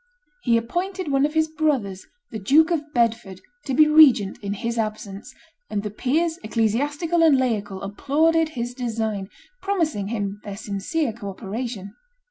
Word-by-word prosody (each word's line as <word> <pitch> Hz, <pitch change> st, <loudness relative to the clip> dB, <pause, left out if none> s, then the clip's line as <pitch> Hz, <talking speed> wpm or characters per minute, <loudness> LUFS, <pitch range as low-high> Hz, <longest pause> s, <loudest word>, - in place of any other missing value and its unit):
He 235 Hz, -6 st, +3 dB
appointed 355 Hz, +8 st, -3 dB
one 275 Hz, +1 st, +3 dB
of 300 Hz, -, -11 dB
his 315 Hz, 0 st, +3 dB
brothers, 280 Hz, -12 st, -1 dB, 0.2 s
the 220 Hz, -, -5 dB
Duke 305 Hz, -, +4 dB
of 305 Hz, -3 st, -2 dB
Bedford, 230 Hz, -6 st, 0 dB, 0.3 s
to 270 Hz, -, -1 dB
be 305 Hz, +2 st, +6 dB
regent 290 Hz, -10 st, +6 dB
in 200 Hz, -1 st, -3 dB
his 230 Hz, +3 st, -3 dB
absence, 215 Hz, -2 st, -4 dB, 0.4 s
and 205 Hz, -, -2 dB
the 210 Hz, -, -4 dB
peers, 320 Hz, -, 0 dB
ecclesiastical 285 Hz, -, 0 dB
and 315 Hz, -4 st, +6 dB
laical, 205 Hz, -7 st, -1 dB
applauded 315 Hz, +10 st, +1 dB
his 240 Hz, +1 st, -3 dB
design, 220 Hz, -5 st, -3 dB, 0.3 s
promising 325 Hz, -, -1 dB
him 205 Hz, -2 st, -3 dB
their 200 Hz, -2 st, -7 dB
sincere 220 Hz, +7 st, -2 dB
co 210 Hz, -3 st, -7 dB
operation. 205 Hz, 0 st, -6 dB
235 Hz, 150 wpm, -23 LUFS, 205-305 Hz, 0.4 s, be